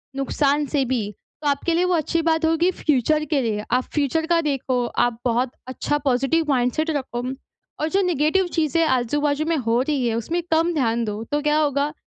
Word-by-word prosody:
नुकसान 280 +2 +1
से 280 -1 +1
भी, 230 -5 -2 0.3
तो 295 - -2
आपके 285 +4 +1
लिए 355 +2 +2
वो 360 - +1
अच्छी 330 +1 0
बात 320 0 +1
होगी 330 +3 +2
फ़्यूचर 305 0 +1
के 275 - +3
लिए। 215 -3 -2
आप 250 +1 +2
फ़्यूचर 300 +2 0
का 340 0 +3
देखो 265 -4 -1 0.2
आप 235 -1 -6
बहुत 245 +1 +1 0.2
अच्छा 280 +3 -1
पॉज़िटिव 270 +5 +2
माइंडसेट 260 +5 +1
रखो 260 -4 -3 0.6
और 310 - 0
जो 390 +4 +2
नेगेटिव 355 +1 +1
चीज़ें 325 +1 +2
आजू-बाजू 285 +3 0
में 330 - +2
हो 235 -2 +1
रही 270 -2 0
है, 225 - 0
उसमें 325 +10 -2
कम 330 +2 +2
ध्यान 235 -5 0
दो, 210 +1 -4
तो 290 +5 -2
क्या 300 +1 +2
होगा, 290 -1 +1
290 Hz, 195 wpm, -22 LUFS, 250-320 Hz, 0.6 s, के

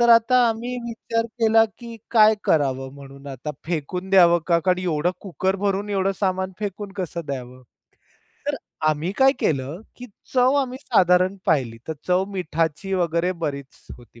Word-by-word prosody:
तर 235 - +4
आता 230 +2 +6
आम्ही 235 +3 -3
विचार 230 0 -2 0.2
केला, 225 0 +5
की 235 -1 -9
काय 220 -2 +6
करावं 135 -3 +1
म्हणून. 140 0 -13
आता 135 +2 -6 0.2
फेकून 180 +3 -3
द्यावं 175 -3 +6
का 170 -2 +3
कारण 180 +2 +1
एवढं 175 -1 0
कुकर 190 0 -1
भरून 200 +1 -1
एवढं 195 0 +1
सामान 190 -1 0
फेकून 205 -1 -5
कसं 175 -2 -3
द्यावं, 130 -2 -6 0.8
तर - - 0 0.3
आम्ही 155 +5 -1
काय 270 0 +6
केलं, 140 +4 -1 0.2
की 250 - -9 0.3
चव 255 +2 +4
आम्ही 255 -1 -4
साधारण 185 -4 +3
पाहिली, 125 -7 +1
तर 160 - -1 0.2
चव 180 +1 +3
मिठाची 165 0 -2
वगैरे 175 0 +1
बरीच 140 -2 -6
होती. 120 -1 -18
185 Hz, 155 wpm, -23 LUFS, 150-210 Hz, 0.8 s, आता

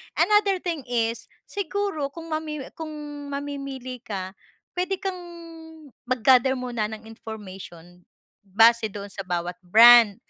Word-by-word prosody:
Another 400 +1 +3
thing 335 -6 -3
is, 230 -1 -1 0.2
siguro 400 -6 -2
kung 330 +2 -9
mamimi 305 -3 -4
kung 320 -2 -6 0.4
mamimili 275 -3 -5
ka, 190 -3 -5 0.4
pwede 365 +1 -1
kang 380 -2 -3 0.9
mag-gather 255 +1 +4
muna 240 -4 -2
ng 220 0 -8
information 185 -6 -10 0.4
base 225 +3 +4
doon 200 0 -7
sa 195 0 -6
bawat 175 -1 -3
brand. 225 +2 +8
245 Hz, 115 wpm, -25 LUFS, 210-310 Hz, 0.9 s, brand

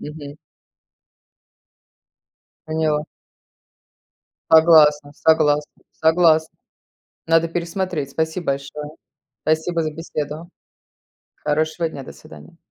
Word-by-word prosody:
Мгм. 150 -1 -9 2.3
Поняла. 155 -1 -1 1.4
Согласна 155 -3 +6
согласна 150 -1 +1
согласна. 160 -1 +3 0.7
Надо 165 0 +3
пересмотреть. 170 -3 -3
Спасибо 160 +4 -3
большое. 140 +2 -4 0.5
Спасибо 160 +2 0
за 155 -1 -3
беседу. 155 0 -6 0.9
Хорошего 155 +3 -1
дня. 140 -4 -9
До - - -10
свидания. 165 +2 -15
155 Hz, 75 wpm, -21 LUFS, 150-165 Hz, 2.3 s, Согласна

